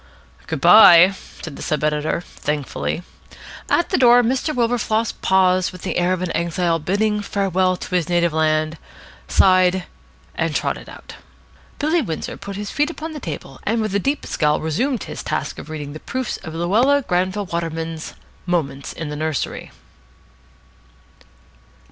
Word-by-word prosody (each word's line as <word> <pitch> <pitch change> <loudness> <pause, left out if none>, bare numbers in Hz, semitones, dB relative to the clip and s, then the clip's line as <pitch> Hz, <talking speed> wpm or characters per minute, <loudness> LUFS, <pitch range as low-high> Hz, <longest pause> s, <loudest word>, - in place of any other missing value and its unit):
"Good 160 -2 -3
bye," 180 -1 +8 0.3
said 160 -4 -7
the - - -9
sub 150 -1 -2
editor 150 +2 0
thankfully. 150 +1 -4 0.7
At 345 - +2
the - - +1
door 245 -1 +6
Mr. 260 +6 0
Wilberfloss 230 -3 0
paused 185 -1 +3
with 185 -1 -12
the - - -2
air 175 +1 +1
of 185 -1 -1
an 180 - -3
exile 170 0 0
bidding 210 +6 0
farewell 190 -2 0
to - - -8
his 180 -1 +1
native 170 -2 +2
land, 155 0 +1 0.5
sighed, 185 - +4 0.5
and - - -2
trotted - - -2
out. - - -12 0.6
Billy 315 +3 +1
Windsor 165 - -4
put 200 0 -8
his 205 0 -5
feet 295 +1 +1
upon 320 -1 -6
the 305 - -7
table, 145 - -7
and 225 +2 0
with 215 -3 -2
a 200 - +2
deep 280 +8 -1
scowl 150 -1 +1
resumed 235 - -1
his - - -7
task - - -3
of - - -10
reading 150 -2 -6
the 155 - -8
proofs 255 +5 -4
of 160 -3 -9
Luella 235 +12 +2
Granville 185 +1 -1
Waterman's 165 -2 -4 0.3
"Moments 140 -6 -2
in 160 -2 -6
the 150 - -5
Nursery." 155 -1 -3
180 Hz, 155 wpm, -20 LUFS, 160-215 Hz, 0.7 s, bye